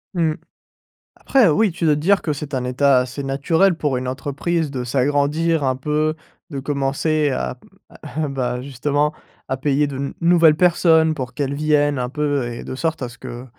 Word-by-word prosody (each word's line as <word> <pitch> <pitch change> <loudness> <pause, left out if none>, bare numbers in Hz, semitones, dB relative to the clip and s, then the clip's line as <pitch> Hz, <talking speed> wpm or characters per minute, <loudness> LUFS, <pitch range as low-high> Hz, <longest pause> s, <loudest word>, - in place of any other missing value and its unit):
Mmh. 165 -3 +1 0.8
Après 260 -6 +3
oui, 200 +6 +3
tu 170 0 -3
dois 150 -2 +4
te - - -3
dire 195 +6 +3
que 155 - -2
c'est 145 0 -7
un 130 -2 -1
état 130 +1 +3
assez 125 +3 -4
naturel 160 +7 +2
pour 145 -5 -1
une 125 0 -4
entreprise 145 +5 -2
de 130 -3 -3
s'agrandir 145 +5 +1
un 130 -1 +1
peu, 150 +3 -1 0.4
de 140 - -4
commencer 145 +2 0
à 65 - -3 0.3
à 155 0 -5
bah, 125 -3 -2
justement 145 +3 -1 0.3
à 130 - -2
payer 145 +2 +1
de 140 -2 -6
nou 140 +1 -4
nouvelles 170 -2 +5
personnes 160 -2 +4
pour 125 -3 -5
qu'elles 140 +1 -2
viennent 145 -1 +2
un 125 0 -2
peu 145 -2 -1
et 120 - -7
de - - -6
sorte 160 +3 -2
à 125 - -3
ce 125 - -14
que 125 -1 -8
145 Hz, 190 wpm, -20 LUFS, 130-155 Hz, 0.8 s, nouvelles